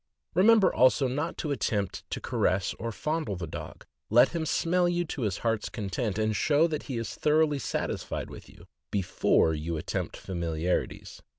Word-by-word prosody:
Remember, 205 +1 +5
also, 130 +2 +4
not 145 +6 -2
to 150 - -3
attempt 105 -7 -2
to - - -3
caress 95 0 0
or 115 0 -3
fondle 155 -3 -2
the 90 -1 -4
dog; 75 - -8 0.2
let 120 +3 +6
him 165 -2 -3
smell 175 +2 +2
you 175 0 0
to 150 -3 -5
his 105 -4 -1
heart's 115 -2 0
content, 105 0 -3
and 110 0 +1
show 150 +6 +3
that 155 -3 -2
he 130 - -2
is 115 -1 -4
thoroughly 150 -1 +2
satisfied - - -3
with - - -11
you, - - -16 0.2
before 95 -4 +2
you 80 +2 -3
attempt 75 - -3
familiarities. 85 -1 -3
120 Hz, 170 wpm, -28 LUFS, 95-155 Hz, 0.2 s, let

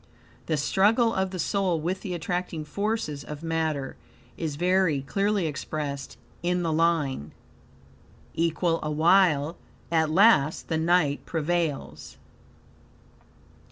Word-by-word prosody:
The 155 - 0
struggle 220 - +3
of 190 0 0
the 185 - -6
soul 180 0 0
with 180 +5 -2
the 185 -4 -4
attracting 175 -1 -3
forces 200 -6 -2
of 150 +1 -8
matter 160 -4 -2 0.4
is 160 -4 -3
very 175 -3 +2
clearly 200 +4 0
expressed 145 -2 -4 0.2
in 180 0 0
the 165 -2 0
line: 155 - 0 1.0
"Equal 165 0 0
awhile, 155 0 +3 0.3
at 160 -2 +2
last 165 -4 +4
the 160 - 0
night 160 -3 +2
prevails." 165 -2 -2
165 Hz, 110 wpm, -26 LUFS, 150-185 Hz, 1.0 s, last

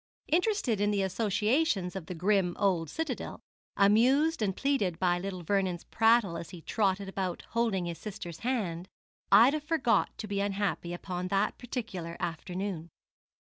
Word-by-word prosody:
Interested 335 - +1
in 205 - +3
the 200 -2 +1
associations 210 - +1
of 185 -4 -6
the 180 - -5
grim 180 0 +1
old 180 -6 +1
citadel, 315 -6 -4 0.4
amused 255 +10 +4
and 195 -3 0
pleased 240 -12 0
by 175 -1 +2
little 185 -1 -5
Vernon's 185 -1 0
prattle 225 -6 +3
as 165 - -7
he 180 - -9
trotted 200 -2 0
about 190 -2 -3
holding 225 -6 0
his 170 -2 -5
sister's 200 -6 -7
hand, 190 -9 -2 0.4
Ida 240 +9 +7
forgot 300 -5 +2
to 215 - -5
be 200 -1 -2
unhappy 200 -3 -1
upon 180 +1 -4
that 195 +2 0
particular 215 -9 -5
afternoon. 175 0 -4
195 Hz, 145 wpm, -30 LUFS, 180-230 Hz, 0.4 s, Ida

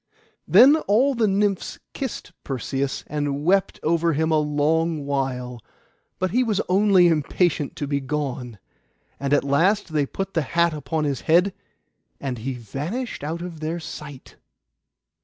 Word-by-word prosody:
Then 280 +5 +7
all 250 +8 +3
the 230 -3 +2
Nymphs 200 -1 0 0.2
kissed 260 -8 -5
Perseus, 135 +1 -3
and 145 0 -3
wept 195 +2 +2
over 165 +1 +2
him 160 +2 0
a 155 - +4
long 150 +1 0
while; 125 -3 -2 0.6
but 185 -1 -1
he 250 +4 +3
was 215 -4 0
only 190 -1 +5
impatient 160 -1 0
to 145 - -3
be 140 0 -1
gone. 130 -5 -4 0.6
And 140 0 -2
at 145 - +4
last 170 +6 +1
they 145 -2 +1
put 195 +5 -5
the 165 - +1
hat 170 +3 +1
upon 155 +1 -2
his 140 -3 -1
head, 180 +4 +3 0.7
and 130 -4 -4
he 130 +3 -4
vanished 145 - -5
out 165 +3 -4
of 175 -3 -7
their 160 +2 -3
sight. 145 -4 -10
155 Hz, 150 wpm, -23 LUFS, 140-185 Hz, 0.7 s, Then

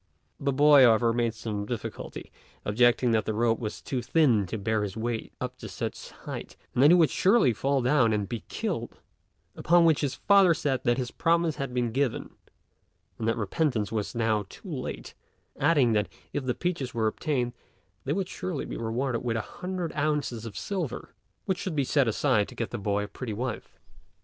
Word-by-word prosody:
The 140 0 0
boy, 145 +1 +6
however, 115 -1 +5
made 115 -1 0
some 105 -2 -4
difficulty, 120 -1 -6 0.3
objecting 120 +3 +3
that 110 -1 +2
the 110 - -2
rope 115 0 +2
was 110 -3 -5
too 130 -2 -2
thin 120 - +3
to 110 - -4
bear 110 +1 0
his 105 0 -4
weight 115 0 -3
up - - -5
to - - -8
such - - -5
a - - -17
height, - - -7 0.2
and 125 - +1
that 145 - +8
he 175 - +8
would 165 -4 +4
surely 195 - +4
fall 135 +3 0
down 125 -3 +3
and 105 -2 0
be 115 +1 -5
killed; - - -3 0.6
upon 170 +1 +4
which 160 -3 +4
his 145 -3 -1
father 195 -4 +5
said 135 -4 -1
that 120 -1 +3
his 125 -2 -3
promise 165 -2 +1
had 135 -3 -3
been 120 -2 -1
given 135 0 -1 0.9
and 110 - -2
that 115 - +1
repentance 110 - 0
was 110 -1 -3
now 110 -3 0
too - - -10
late, - - -5 0.5
adding 140 -6 +4
that 105 -2 +1 0.2
if 145 -2 -2
the 125 - 0
peaches 155 -10 -3
were 115 -1 +1
obtained 120 +1 -1 0.5
they 140 - -1
would 190 0 -1
surely 180 -5 -4
be - - -6
rewarded 120 +2 -2
with 115 -2 -1
a - - 0 0.2
hundred 180 -2 -3
ounces 145 -6 -1
of 105 - -9
silver, 180 - -4 0.3
which 190 -1 -1
should 180 -5 -3
be 140 - +2
set 135 0 +2
aside 110 -2 +2
to - - -12
get 115 - -3
the 120 - -4
boy 100 0 0
a - - -5
pretty 115 0 -6
wife. 120 +2 -5
125 Hz, 200 wpm, -27 LUFS, 110-150 Hz, 0.9 s, that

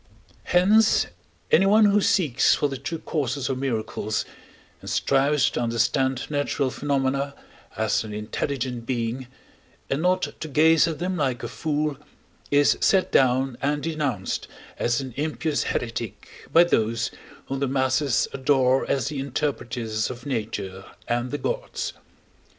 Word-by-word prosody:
Hence 205 +5 +4 0.5
anyone 210 +3 +6
who 205 0 +4
seeks 150 - +3
for 145 - +1
the 135 -1 -5
true 140 +5 -4
causes 140 -4 -2
of 130 -1 -2
miracles, 110 -4 -2 0.6
and - - -7
strives 140 +1 +2
to - - -2
understand 120 +3 +1
natural 145 -2 -1
phenomena 140 0 -1 0.4
as - - +1
an 110 - -8
intelligent 120 +3 -3
being, 120 0 -2 0.6
and 135 +3 0
not 185 +1 +2 0.2
to 155 - -5
gaze 160 +3 +5
at 160 -2 -3
them 180 +1 -2
like 130 -5 -1
a - - -2
fool, 150 -2 -2 0.5
is 145 0 +4
set 190 -2 +3
down 130 -1 +2
and 145 +2 0
denounced 145 - -2 0.3
as 120 +2 +1
an 130 -2 -7
impious 155 +1 -1
heretic 115 -3 -5
by 170 - +7
those, 115 -8 0 0.3
whom 135 0 -3
the 140 - 0
masses 130 0 +1
adore 130 -1 +2
as 135 0 +1
the 145 -2 -4
interpreters 120 -5 -2
of 125 -1 -8
nature 105 -7 -4 0.2
and 120 +1 -1
the 145 - -2
gods. - - -3
135 Hz, 140 wpm, -24 LUFS, 120-150 Hz, 0.6 s, by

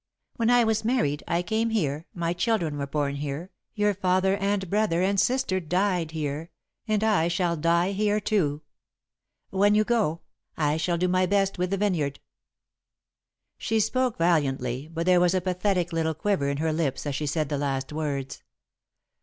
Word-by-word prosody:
When 230 0 +1
I 245 -1 +5
was 220 -1 +1
married, 220 - 0
I 170 +1 0
came 220 +5 0
here, 155 -8 -1
my 170 -1 -2
children 175 -6 0
were 140 - -3
born 140 0 -1
here, 145 +6 -5 0.2
your 210 -1 +2
father 185 0 +2
and 200 -1 -1
brother 200 -2 +1
and 195 +1 +2
sister 245 -3 +1
died 180 0 0
here, 155 0 -4 0.4
and 215 -1 +1
I 210 -7 +3
shall 170 0 0
die 170 +3 +2
here 210 +1 +1
too. 155 -9 0 0.9
When 205 +2 +3
you 215 - +4
go, 215 -9 0 0.4
I 150 -1 +1
shall 170 +1 0
do 180 +2 +1
my 185 0 +2
best 195 -1 +1
with 180 0 0
the 195 - 0
vineyard." 170 -9 0 1.4
She 225 -1 0
spoke 250 +3 0
valiantly, 140 -5 0
but 165 0 -3
there 180 -1 +5
was 180 +1 +3
a - - +3
pathetic 180 -1 0
little 160 -1 0
quiver 170 -4 0
in 140 - -2
her 160 +1 0
lips 155 -4 -1
as 145 - -2
she 150 +2 -2
said 150 0 -1
the 145 - -1
last 135 0 -2
words. 140 -3 -3
175 Hz, 175 wpm, -26 LUFS, 155-205 Hz, 1.4 s, I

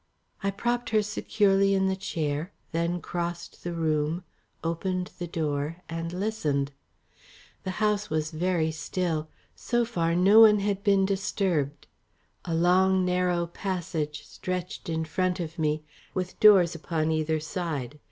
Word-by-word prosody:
I 195 - 0
propped 240 +4 -1
her 215 -1 +3
securely 195 -2 +2
in 190 0 +2
the 190 0 +1
chair, 160 -3 -2 0.2
then 170 +1 -1
crossed 175 0 -5
the 175 - -3
room, 160 0 0 0.4
opened 180 +2 -2
the 175 - -3
door 155 -1 -2
and 165 0 -4
listened. 175 -8 -1 0.9
The - - -2
house 210 -1 +1
was 155 0 -1
very 165 -1 0
still; 160 -1 -2 0.3
so 240 -1 0
far 170 -8 0
no 195 +5 +6
one 215 -2 +8
had 200 0 -1
been 195 -2 +4
disturbed. 190 -7 -1 0.6
A 165 - -1
long 185 +2 +4
narrow 180 -1 +1
passage 165 -5 -3
stretched 180 -2 -5
in 160 0 -1
front 185 +3 0
of 165 0 -5
me, 155 0 0 0.3
with 185 -1 -3
doors 195 -5 +7
upon 160 -1 -1
either 155 0 +1
side. 150 -4 -4
175 Hz, 140 wpm, -27 LUFS, 160-195 Hz, 0.9 s, one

